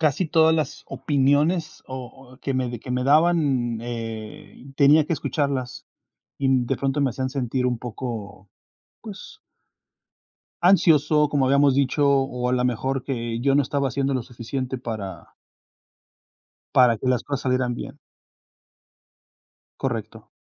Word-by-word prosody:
casi 155 +3 +1
todas 160 0 +4
las 155 -1 -3
opiniones 145 +4 0
o 130 0 -9
o 130 - -17
que 135 - -3
me 125 -2 -2
que 125 - -9
me 125 0 -1
daban, 145 -6 +2
eh, 115 -1 -7
tenía 145 +3 +5
que 160 - -3
escucharlas 140 -5 -2 0.5
y 135 - 0 0.2
de 135 +2 -1
pronto 140 +2 -1
me 135 - +2
hacían 130 +2 -3
sentir 130 -1 -1
un 125 -2 -1
poco, 110 -5 -7 0.5
pues 215 - -10 1.2
ansioso, 155 -5 +4
como 140 -3 +2
habíamos 140 0 +4
dicho, 140 +1 +2
o 135 -3 +1
a - - 0
la 125 0 +1
mejor 130 +2 -1
que 115 -3 -3
yo 135 +1 +2
no 145 - +4
estaba 140 +1 -1
haciendo 135 +2 -1
lo 130 - -1
suficiente 125 +3 -5
para 110 -6 -7 1.4
para 125 -3 +5
que 130 - -6
las 125 -1 +1
cosas 140 -2 -3
salieran 125 -1 0
bien. - - -8 1.8
Correcto. 110 -3 -4
130 Hz, 140 wpm, -23 LUFS, 125-145 Hz, 1.8 s, tenía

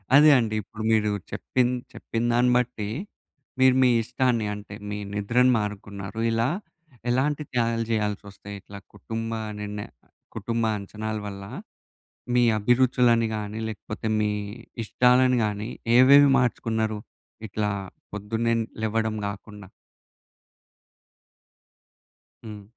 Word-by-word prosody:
అదే 150 +1 +8
అండి, 110 -3 0
ఇప్పుడు 110 +2 -9
మీరు 105 -1 +3 0.2
చెప్పిం 125 -1 0 0.3
చెప్పిందాన్ని 120 +2 +1
బట్టి, 115 -4 -2 0.7
మీరు 130 -1 +6
మీ 125 - +5
ఇష్టాన్ని, 125 -2 0
అంటే, 105 0 -8
మీ 105 - -3 0.2
నిద్రను 120 +5 +3
మానుకున్నారు. 100 0 -5
ఇలా 115 +2 +1 0.6
ఎలాంటి 145 +4 +1
త్యాగాలు 115 -2 0
చేయాల్సొస్తాయి? 105 -1 -3
ఇట్లా 100 +1 -11 0.2
కుటుంబా 115 - -4 0.2
నిర్ణయ 105 0 -5 0.5
కుటుంబా 115 -1 -1
అంచనాల 110 +2 -5
వల్ల, 100 0 -7 0.9
మీ 120 - +5
అభిరుచులని 120 0 +3
గానీ, 105 +1 -5
లేకపోతే 110 +1 -6
మీ 105 0 +1 0.5
ఇష్టాలని 125 +1 +4
గానీ, 105 +1 -3 0.3
ఏవేవి 140 +2 +8
మార్చుకున్నారు? 110 -3 0 0.5
ఇట్లా 105 +1 -1 0.4
పొద్దున్నే 115 +3 -1 0.3
లెవ్వడం 110 0 0
గాకుండా. 100 -1 -8 2.8
హ్మ్. 105 -2 -8
110 Hz, 100 wpm, -25 LUFS, 105-120 Hz, 2.8 s, అదే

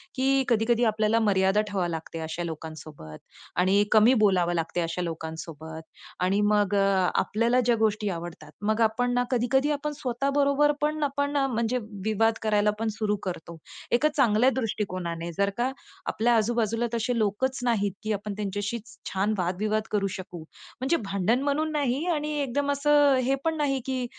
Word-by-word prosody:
की 270 +1 +2
कधी-कधी 235 +1 +2
आपल्याला 215 +1 +1
मर्यादा 195 -1 +3
ठेवावी 180 -4 -1
लागते 165 0 -6
अशा 165 +2 -4
लोकांसोबत 155 - -8 0.4
आणि 195 +3 +4
कमी 220 +3 +6
बोलावं 180 -4 +3
लागते 170 +1 -1
अशा 165 +2 -2
लोकांसोबत 160 -1 -6 0.4
आणि 195 +2 +2
मग 205 -1 +2
आपल्याला 200 +5 +2
ज्या 240 0 +2
गोष्टी 210 -1 +1
आवडतात, 170 -3 -7
मग 215 +2 0
आपण 245 +3 +1
ना 245 0 +2
कधी-कधी 265 +4 +2
आपण 295 +1 -2
स्वतः 255 +2 -2
बरोबर 285 +1 +3
पण 300 0 0
आपण 285 0 -1
अ, 275 - +2
म्हणजे 235 0 0 0.3
विवाद 225 +1 +2
करायला 210 -1 +2
पण 225 - -1
सुरू 210 -1 0
करतो. 170 -2 -6 0.3
एका 295 +6 +3
चांगल्या 240 -1 +4
दृष्टिकोनाने 180 -6 -3
जर 200 0 +2
का 250 +2 0 0.3
आपल्या 235 +2 +1
आजू 220 +2 +1
बाजूला 230 +2 0
तसे 235 +1 -1
लोकच 235 +6 0
नाहीत, 205 -5 +1
की 215 0 -1
आपण 205 0 -4
त्यांच्याशी 205 +2 -3 0.3
छान 200 +3 +1
वाद-विवाद 210 +5 -1
करू 200 -2 +1
शकू, 180 -2 -8 0.4
म्हणजे 280 +6 +2
भांडण 200 +7 0
म्हणून 305 +2 0
नाही 285 +1 0
आणि 300 0 -2
एकदम 285 +3 -1
असं 290 0 +4
हे 270 +2 +2
पण 325 -1 0
नाही, 275 -3 0
की 260 -2 -2
215 Hz, 160 wpm, -26 LUFS, 190-260 Hz, 0.4 s, कमी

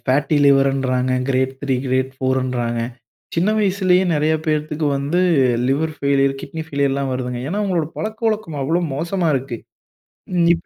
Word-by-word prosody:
Fatty 140 +4 +1
லிவருன்றாங்க, 135 -2 +2 0.2
great 130 0 +1
3 135 -2 0
great 130 +1 0
4 130 0 0
ன்றாங்க, 120 -2 -2 0.5
சின்ன 180 +5 +2
வயசுலயே 190 -2 +3
நிறைய 155 +1 +2
பேத்துக்கு 155 0 -1
வந்து 145 +6 0 0.5
லிவர் 155 +3 0
ஃபெயிலியர், 140 -1 +2
கிட்னி 160 +3 -6
ஃபெய்லியர்லாம் 140 -2 0
வருதுங்க. 125 -1 -3
ஏன்னா? 205 +5 -1
அவங்களோட 175 -6 0
பழக்க 220 +1 -4
வழக்கம் 210 -9 -3
அவ்ளோ 170 +6 +1
மோசமா 170 +3 -1
இருக்கு. 130 -3 -3 0.8
ம். 170 -1 +4
இப்ப 170 - -5
140 Hz, 145 wpm, -20 LUFS, 130-170 Hz, 0.8 s, ம்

